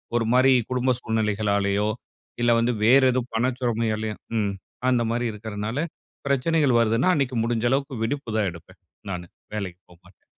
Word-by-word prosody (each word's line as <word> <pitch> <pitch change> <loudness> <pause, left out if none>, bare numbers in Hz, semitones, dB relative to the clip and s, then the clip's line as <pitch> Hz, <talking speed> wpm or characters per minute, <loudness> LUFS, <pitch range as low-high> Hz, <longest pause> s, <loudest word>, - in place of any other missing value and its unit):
ஒரு 115 -1 +2
மாரி 130 +1 +5 0.2
குடும்ப 130 0 +2
சூழ்நிலைகளாலேயோ, 105 -2 0 0.5
இல்ல 120 0 +4
வந்து 120 +1 +1
வேற 125 +5 +6
எதுவும் 125 -1 -2
பண 120 +3 +2
சுமையாலேயோ 110 -3 -1 0.2
ம். 100 -2 0 0.4
அந்த 125 -2 +3
மாரி 120 +1 -1
இருக்கிறதுனால, 105 +2 -5 0.5
பிரச்சனைகள் 140 -1 +2
வருதுன்னா 115 +8 +2
அன்னைக்கு 135 -5 0
முடிஞ்ச 115 0 0
அளவுக்கு 140 0 0
விடுப்புதான் 115 -6 -1
எடுப்பேன் 85 -1 -15 0.3
நானு. 90 -2 -5 0.3
வேலைக்கு 95 -3 -5
போமாட்டேன். 90 +1 -21
115 Hz, 140 wpm, -24 LUFS, 105-125 Hz, 0.5 s, வேற